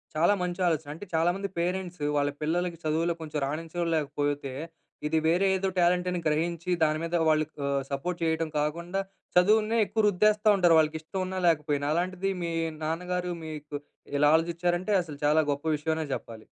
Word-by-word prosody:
చాలా 170 +6 +4
మంచి 175 0 -3
ఆలోచన. 160 -3 -1
అంటే 185 +6 -9
చాలా 165 +2 +3
మంది 200 0 -3
పేరెంట్స్, 180 -2 -2
వాళ్ళ 145 0 +2
పిల్లలకి 170 +2 -1
చదువులో 160 +2 +1
కొంచెం 155 -1 -3
రాణించంలేకపోతే, 150 -3 -2 0.5
ఇది 160 +1 +1
వేరే 180 +4 +3
ఏదో 190 +1 0
టాలెంట్ 180 +1 +3
అని 180 - -1
గ్రహించి, 165 +3 -1
దాని 155 0 +2
మీద 165 +1 -2
వాళ్ళు 155 0 +3 0.2
ఆహ్, 140 -1 +1
సపోర్ట్ 175 +6 -3
చేయటం 160 0 0
కాకుండా, 170 +6 -1 0.4
చదువునే 215 +4 +4
ఎక్కువ 220 +2 0
రుద్దేస్తా 210 +2 +3
ఉంటారు. 175 -3 +5
వాళ్ళకి 155 0 +1
ఇష్టం 185 +4 -4
ఉన్నా, 185 0 -3
లేకపోయినా. 150 -3 +1
అలాంటిది 185 +2 -1
మీ 170 - -2 0.3
నాన్నగారు 180 +3 -2
మీకు 150 -1 -7 0.4
ఇలా 145 +1 +5
ఆలోచించారంటే, 175 +4 0
అసలు 150 -4 -10
చాలా 155 +1 +4
గొప్ప 145 +2 -4
విషయం 160 +2 -1
అనే 160 - -2
చెప్పాలి. 110 -1 -9
165 Hz, 165 wpm, -28 LUFS, 155-180 Hz, 0.5 s, ఉంటారు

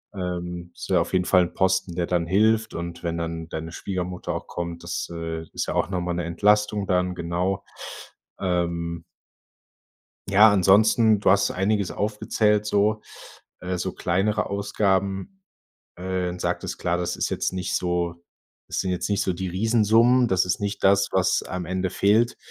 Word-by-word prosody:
Ähm, 90 -1 -5
ist - - -8
ja 90 -2 +4
auf 85 - -4
jeden 90 -1 +2
Fall 90 0 +4
'n 85 - -5
Posten, 95 -2 +1
der 85 -1 0
dann 85 -2 0
hilft. 110 +4 +2
Und 85 0 -6
wenn 85 -1 -2
dann 80 -1 -4
deine 80 +1 -5
Schwiegermutter 90 0 -4
auch - - -5
kommt. 85 -1 -5
Das, 85 -1 -3
äh, 80 -1 -4
ist - - -2
ja - - -2
auch - - +1
noch 95 -2 -2
mal 90 0 -2
'ne 85 -1 -2
Entlastung 105 +3 +2
dann, 90 0 +1
genau. 90 +3 -2 0.8
Ähm 85 -2 -2 1.3
ja, 105 +3 +7
ansonsten, 105 +3 +4
du 100 - +2
hast 100 0 +3
einiges 100 0 0
aufgezählt, 105 0 0
so, 105 +1 +1 0.6
äh, 90 0 -3
so 90 +1 -2
kleinere 95 +5 0
Ausgaben, 100 - -1 0.5
äh, 90 0 -3
sagtest - - -3
klar, 85 0 0
das 90 - -2
ist - - -1
jetzt - - -1
nicht 95 0 -2
so 85 -1 -2 0.5
das - - -2
sind 95 - -2
jetzt 90 - -2
nicht 100 -1 +1
so 95 - 0
die 95 +2 -4
Riesensummen, 115 +5 +3
das 95 -5 +2
ist 90 - -1
nicht 100 0 -3
das, 100 0 +4
was 95 0 +2
am 90 -2 -5
Ende 95 +1 -1
fehlt. 110 +6 +2
95 Hz, 170 wpm, -24 LUFS, 85-100 Hz, 1.3 s, ja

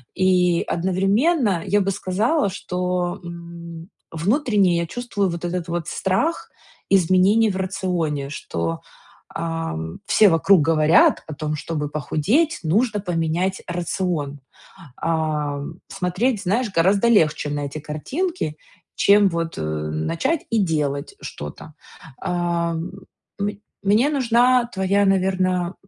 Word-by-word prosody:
И 180 -2 +3
одновременно 195 - +1
я 205 0 +2
бы 195 - 0
сказала, 205 - 0
что, 180 -1 -2
м, 170 0 -9 0.2
внутренне 200 - +2
я 170 0 -1
чувствую 210 -2 -2
вот 170 0 -5
этот 175 0 -3
вот 170 -2 -3
страх 195 - -1 0.4
изменений 195 +4 +4
в 185 - -4
рационе, 180 -7 -2
что, 85 - -3 0.6
ам, 165 - -4
все 210 - +5
вокруг 165 +2 +4
говорят 155 +1 +4
о 155 - -6
том, 155 0 -3
чтобы 150 -1 -3
похудеть, 205 - 0
нужно 210 +6 +1
поменять 175 +1 -1
рацион. 170 -4 -2 0.6
Ам, 155 -1 -2
смотреть, 195 +5 -1
знаешь, 210 +4 0
гораздо 195 +6 +3
легче 155 -9 +3
на 145 0 -2
эти 140 +2 -6
картинки, 155 - -3 0.4
чем 200 0 +5
вот, 165 -1 -3
э, - - -3
начать 75 - -1
и 230 - +2
делать 150 -5 -2
что-то. 75 0 -8 0.5
Э, 170 -1 0 0.6
мн 205 +1 -1 0.3
мне 215 +8 +3
нужна 250 -2 +3
твоя, 195 +1 +2
наверно, 185 -2 +1
180 Hz, 115 wpm, -22 LUFS, 160-200 Hz, 0.6 s, все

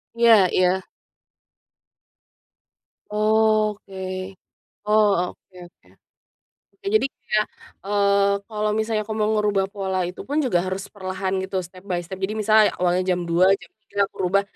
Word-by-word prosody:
Iya 225 -5 +6
iya. 185 +1 +2 2.3
Oh, 215 0 +2
oke. 195 - -15 0.9
Oh, 215 0 +5 0.2
oke 185 - -27
oke. - - -32 1.0
Nah, 395 - -3
jadi 350 - +4 0.2
kayak, 215 -1 +2 0.4
eee, 200 -1 +3
kalau 215 -1 -2
misalnya 220 -1 0
aku 215 +1 -5
mau 215 0 +1
ngerubah 205 -2 +1
pola 190 -2 -2
itu 180 - -7
pun 295 +2 0
juga 175 -8 +1
harus 190 +2 -4
perlahan, 190 0 -3
gitu, 190 0 -3
step 185 +1 -16
by 180 -3 -1
step, 185 +2 -8
jadi 210 +3 -1
misalnya 215 0 +5
awalnya 180 0 +2
jam 180 0 +1
02:00, 170 +2 +3
jam - - -15
03:00 200 - -11
aku - - -25
rubah 195 +2 +2
200 Hz, 145 wpm, -23 LUFS, 185-215 Hz, 2.3 s, Iya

